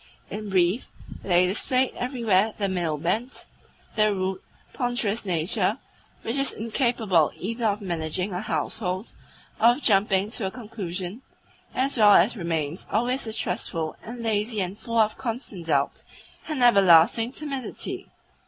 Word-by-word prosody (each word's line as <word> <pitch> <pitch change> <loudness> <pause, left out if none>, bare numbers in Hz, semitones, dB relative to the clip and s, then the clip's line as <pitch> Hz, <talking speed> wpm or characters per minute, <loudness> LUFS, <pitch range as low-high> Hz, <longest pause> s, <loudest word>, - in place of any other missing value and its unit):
In 210 0 -5
brief, 185 +4 +2 0.3
they 180 -1 +3
displayed 255 +7 +1
everywhere 225 -5 +1
the 200 - +1
male 175 -5 -1
bent, 215 - -2 0.5
the 215 -1 +4
rude, 190 -1 -2 0.3
ponderous 240 -4 -1
nature 170 -2 +1 0.5
which 235 +5 -1
is 275 0 +2
incapable 220 - +1
either 230 +4 -2
of 210 0 -1
managing 180 +1 -2
a 180 - -2
household 195 -1 -3 0.5
or 235 +1 +6
of 290 - -8
jumping 195 -1 +3
to 225 -4 -2
a - - -2
conclusion, 200 -3 -6 0.5
as 265 +1 0
well 210 -2 +7
as 205 +8 +4
remains 165 -3 -3
always 245 +4 0
distrustful 180 -7 -3
and 235 +1 -8
lazy 215 0 0
and 190 +1 -3
full 230 0 -3
of 215 -1 +2
constant 225 -8 -5
doubt 140 -3 +1 0.5
and 300 -5 -1
everlasting 200 +1 +6
timidity. 275 -3 -5
210 Hz, 135 wpm, -25 LUFS, 180-235 Hz, 0.5 s, well